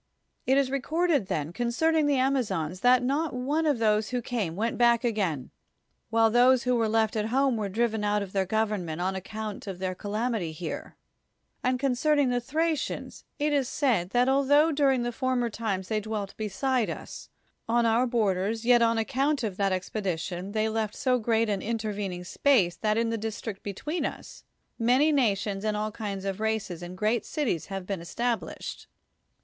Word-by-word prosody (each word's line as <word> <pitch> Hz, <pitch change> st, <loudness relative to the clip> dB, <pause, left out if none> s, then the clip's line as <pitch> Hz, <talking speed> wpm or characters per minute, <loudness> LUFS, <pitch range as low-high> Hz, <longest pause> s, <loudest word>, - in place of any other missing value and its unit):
It 265 Hz, +1 st, +4 dB
is 270 Hz, -2 st, +2 dB
recorded, 300 Hz, -, +1 dB
then, 155 Hz, 0 st, -2 dB
concerning 300 Hz, -, +1 dB
the 290 Hz, -, +3 dB
Amazons, 205 Hz, -, 0 dB
that 250 Hz, +3 st, +4 dB
not 285 Hz, +3 st, 0 dB
one 290 Hz, +6 st, 0 dB
of 290 Hz, -4 st, +2 dB
those 215 Hz, -1 st, +2 dB
who 250 Hz, -, -1 dB
came 220 Hz, -9 st, -3 dB
went 225 Hz, +4 st, -1 dB
back 235 Hz, 0 st, +4 dB
again, 190 Hz, -, -1 dB, 0.6 s
while 225 Hz, 0 st, +3 dB
those 245 Hz, +2 st, +5 dB
who 250 Hz, 0 st, +2 dB
were 225 Hz, -2 st, +1 dB
left 220 Hz, 0 st, +1 dB
at 215 Hz, 0 st, 0 dB
home 265 Hz, +2 st, +2 dB
were 210 Hz, -3 st, -2 dB
driven 220 Hz, +1 st, 0 dB
out 205 Hz, 0 st, +1 dB
of 190 Hz, -, -10 dB
their 190 Hz, -2 st, +1 dB
government 205 Hz, -6 st, -1 dB
on 190 Hz, +2 st, -1 dB
account 215 Hz, +2 st, -6 dB
of 190 Hz, -2 st, -5 dB
their 185 Hz, 0 st, -2 dB
calamity 210 Hz, -3 st, -2 dB
here; 160 Hz, 0 st, -6 dB, 0.7 s
and 255 Hz, 0 st, +1 dB
concern 275 Hz, +3 st, +2 dB
ing 280 Hz, -3 st, +3 dB
the 245 Hz, 0 st, 0 dB
Thracians, 315 Hz, +3 st, -2 dB
[it 295 Hz, 0 st, 0 dB
is 270 Hz, -3 st, +1 dB
said] 225 Hz, -, +1 dB
that 245 Hz, +4 st, +2 dB
altho 285 Hz, +4 st, +4 dB
during 275 Hz, -4 st, +2 dB
the 240 Hz, -, -1 dB
former 245 Hz, -1 st, -1 dB
times 200 Hz, -4 st, -3 dB
they 215 Hz, -1 st, 0 dB
dwelt 210 Hz, -2 st, -4 dB
beside 225 Hz, +4 st, 0 dB
us, -, -, -7 dB, 0.4 s
on 235 Hz, 0 st, +3 dB
our 230 Hz, +3 st, +3 dB
borders, 220 Hz, -1 st, 0 dB
yet 245 Hz, -1 st, +6 dB
on 230 Hz, 0 st, +3 dB
account 275 Hz, +4 st, 0 dB
of 205 Hz, -4 st, -2 dB
that 195 Hz, -1 st, +1 dB
expedition 185 Hz, 0 st, -3 dB
they 220 Hz, 0 st, +1 dB
left 220 Hz, -1 st, -2 dB
so 255 Hz, -1 st, +1 dB
great 225 Hz, 0 st, +1 dB
an 200 Hz, -2 st, -1 dB
intervening 210 Hz, -5 st, -3 dB
space, 190 Hz, -3 st, +2 dB
that 215 Hz, 0 st, 0 dB
in 230 Hz, 0 st, +1 dB
the 230 Hz, -, -2 dB
district 220 Hz, -1 st, -5 dB
between 295 Hz, -, -4 dB
us, -, -, -6 dB, 0.4 s
many 255 Hz, +7 st, +4 dB
nations 205 Hz, -7 st, +1 dB
and 215 Hz, -1 st, 0 dB
all 215 Hz, +1 st, -2 dB
kinds 200 Hz, -3 st, -5 dB
of 195 Hz, 0 st, -3 dB
races 215 Hz, -5 st, -2 dB
and 175 Hz, +1 st, -8 dB
great 215 Hz, +4 st, +1 dB
cities 245 Hz, -, -2 dB
have 195 Hz, -2 st, -5 dB
been 195 Hz, -2 st, -3 dB
established. 235 Hz, +7 st, -3 dB
225 Hz, 180 wpm, -27 LUFS, 200-255 Hz, 0.7 s, yet